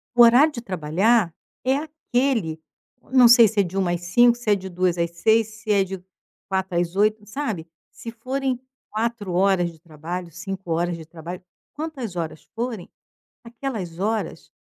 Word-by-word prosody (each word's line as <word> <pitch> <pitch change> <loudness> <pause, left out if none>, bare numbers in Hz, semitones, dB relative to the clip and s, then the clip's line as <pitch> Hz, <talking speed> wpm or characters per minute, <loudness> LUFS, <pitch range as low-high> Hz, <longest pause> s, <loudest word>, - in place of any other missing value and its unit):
O 240 - +8
horário 250 +7 +7
de 235 - -5
trabalhar 185 +1 +1 0.3
é 265 +1 +3
aquele. 255 - -1 0.4
O - - -25
não 255 -2 +7
sei 235 -2 +8
se 215 -1 0
é - - +6
de 185 +1 -5
13:00 180 -2 +1
às 175 - -5
17:00, 240 +7 +4
se 240 -3 -2
é 205 - +7
de 190 -1 -5
14:00 180 -1 0
às 170 0 0
18:00, 220 +5 +3
se 220 0 -9
é 200 -1 +4
de 190 -1 -7 0.5
16:00 190 -2 -1
às 175 0 -1
20:00, 210 +1 +2
sabe? 210 - -4 0.2
Se 230 - -8
forem 255 +2 -2 0.3
4 220 -3 -2
horas 180 -1 +2
de 160 - -19
trabalho, 170 +2 -6
5 180 +1 -7
horas 170 +1 0
de 160 - -10
trabalho. 170 +2 -8 0.3
Quantas 285 - -5
horas 165 -3 -5
forem, 230 -5 -4 0.5
aquelas 230 -8 -5
horas, 210 -5 -2
200 Hz, 175 wpm, -23 LUFS, 175-235 Hz, 0.5 s, O